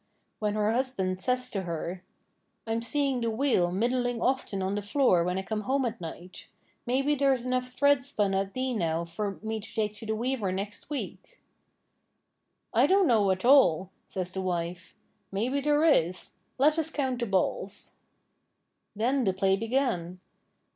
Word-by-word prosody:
When 210 -1 -1
her 215 0 +2
husband 225 -7 -1
says 250 +4 0
to 195 - -2
her: 175 +1 -4 0.6
'I'm 225 0 -1
seeing 270 +1 0
the 230 - 0
wheel 220 -7 +2
middling 245 +4 0
often 245 -7 0
on 190 +1 -1
the 205 - -1
floor 205 -4 +3
when 180 +1 -1
I 190 - -2
come 215 +2 -3
home 265 +4 0
at 230 -3 -4
night; 175 +2 -9 0.4
maybe 270 +4 +2
there's 270 -3 +2
enough 255 0 -1
thread 285 +1 +3
spun 210 -8 0
at 195 0 -1
thee 255 0 -1
now 170 -5 -1
for 195 +4 -4
me 220 0 -2
to 215 - -10
take 210 -2 0
to 220 - -9
the 220 - 0
weaver 235 -4 -1
next 200 +6 -5
week?' 300 - -6 1.3
'I - - +5
don't 390 0 +4
know, 215 -6 +4
at 190 +3 0
all,' 190 - +5 0.2
says 185 -1 -4
the 190 - -3
wife. 175 0 -3 0.4
'Maybe 245 +8 0
there 295 +2 +2
is; 185 - +2 0.3
let 300 +4 +4
us 320 0 +1
count 265 -5 -1
the 235 - -1
balls.' 195 +1 -1 1.0
Then 250 +5 +1
the 190 -4 +2
play 190 +1 +2
began! 225 -6 -1
220 Hz, 170 wpm, -28 LUFS, 190-260 Hz, 1.3 s, I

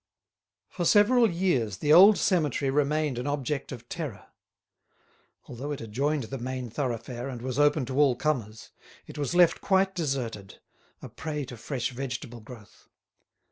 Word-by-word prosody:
For 180 - -5
several 220 +6 +5
years 150 - 0
the 150 +9 +2
old 195 +5 +8
cemetery 150 - +1
remained 150 -2 0
an 125 - -4
object 145 0 -3
of 120 -2 -9
terror. 150 - -6 1.2
Although 130 +5 -6
it 145 - -4
adjoined 135 +6 -1
the 135 +4 -6
main 125 -1 -5
thoroughfare 120 -1 -4
and 125 -3 -6
was 130 +2 -4
open 145 -1 +3
to 130 +3 -3
all 140 -4 +4
comers, 120 -7 -3 0.3
it - - -10
was 145 +4 -2
left 175 -2 +4
quite 190 0 +2
deserted, 125 - -4 0.4
a - - -7
prey 150 -3 -5
to 125 - -9
fresh 125 +2 -4
vegetable 125 -2 -6
growth. 110 -1 -15
135 Hz, 150 wpm, -27 LUFS, 120-155 Hz, 1.2 s, old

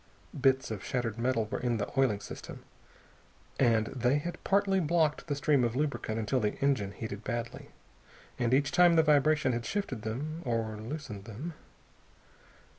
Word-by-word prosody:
Bits 130 -3 +2
of 105 -3 -5
shattered 120 -4 -2
metal 120 -2 +1
were 115 +5 -4
in 120 -2 0
the 100 -1 -2
oiling 125 -7 +2
system, - - -9 1.0
and 115 -4 +4
they 125 +3 +1
had 175 +4 -5
partly 195 -1 +2
blocked 160 -2 +1
the 145 - -1
stream 145 -2 +2
of 120 0 0
lubricant 140 -6 -1
until 115 +4 0
the 105 -3 0
engine 130 -8 0
heated 105 0 -6
badly. 120 +1 -4 0.7
And 120 -1 +1
each 140 +2 +3
time 175 -1 +6
the 160 - +6
vibration 150 -2 +3
had 120 0 -2
shifted 145 - -3
them, 145 +9 -4
or 115 -3 -1
loosened 110 -3 -6
them.... 125 +10 -6
130 Hz, 160 wpm, -30 LUFS, 115-150 Hz, 1.0 s, time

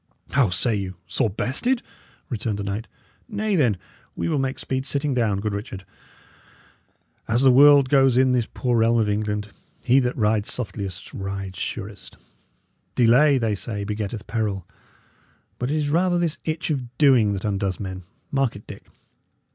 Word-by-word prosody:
"How 130 -6 +3
say 110 +6 0
you? 95 -2 -4
Sore 120 -5 0
bested?" 190 - -1 0.4
returned 115 -5 -3
the 100 - -4
knight. 100 +3 -4 0.4
"Nay, 210 -1 -1
then, 125 - +2 0.4
we - - -2
will 155 -3 +1
make 135 0 -1
speed 130 0 -2
sitting 140 +1 -1
down, 110 -6 +1
good 105 -1 -2
Richard. 100 -2 -6 1.4
As 120 +3 +2
the 130 - +7
world 140 +1 +7
goes 135 -2 +4
in 130 0 +4
this 125 -3 +1
poor 120 -2 0
realm 115 +1 +3
of 110 -2 +2
England, 105 0 -2 0.3
he 130 +2 +5
that 125 -1 -1
rides 105 -2 +1
softliest 100 -5 -4
rides 95 -1 -5
surest. - - -6 0.8
Delay, 130 +5 +5
they 115 -4 0
say, 100 +2 -4
begetteth 105 +1 -4
peril; 105 -5 -2 0.9
but 125 - -2
it 150 - 0
is 145 -1 -1
rather 175 +2 +2
this 170 -2 -1
itch 160 0 -2
of 125 -4 -4
doing 125 -8 +5
that 95 +2 -4
undoes 100 -2 -1
men; 95 -2 -5 0.3
mark 135 -3 +1
it, 100 - -11
Dick. - - -11
115 Hz, 165 wpm, -23 LUFS, 105-135 Hz, 1.4 s, the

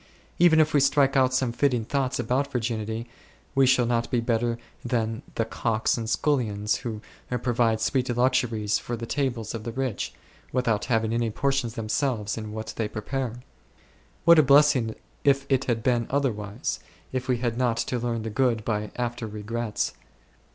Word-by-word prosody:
walking 170 - -2
Even 160 -2 +5
if 155 -1 +3
we 145 - +5
strike 140 0 +3
out 130 -1 +4
some 130 -1 +1
fitting 120 -1 +1
thoughts 135 0 0
about 130 +4 0
virginity, 115 -2 -2 0.5
we 135 -1 +4
shall 125 -1 +4
not 115 0 0
be 120 - +1
better 115 0 0 0.3
than 115 -2 -1
the 115 - +1
cooks 115 0 0
and 115 -2 -4
scullions 110 -8 +1
who 110 -3 -5 0.4
provide 115 -2 +2
sweet 125 +3 0
luxuries 120 -4 +1
for 120 +4 -4
the 115 - -5
tables 120 -4 -2
of 115 -2 -5
the 115 - -4
rich, 130 -3 -2 0.4
without 115 -5 +1
having 115 -2 +1
any 115 -1 +1
portion 135 +1 0
themselves 110 -1 -1
in 110 -1 -6
what 110 +1 -5
they 110 - 0
prepare. 125 +2 -4 0.8
What 170 -1 +8
a - - +9
blessing 140 -5 +4 0.3
if 140 -1 +3
it 135 -1 +2
had 115 -3 -1
been 120 -2 +1
otherwise, 120 -4 -1 0.3
if 130 -1 -3
we 125 -2 +2
had 120 -1 -1
not 120 -2 +1
to 120 +1 -1
learn 115 -1 -2
the 110 - -4
good 115 -1 +1
by 105 -1 -1
after 120 -2 -3
regrets 110 +1 -3
120 Hz, 170 wpm, -26 LUFS, 110-130 Hz, 0.8 s, a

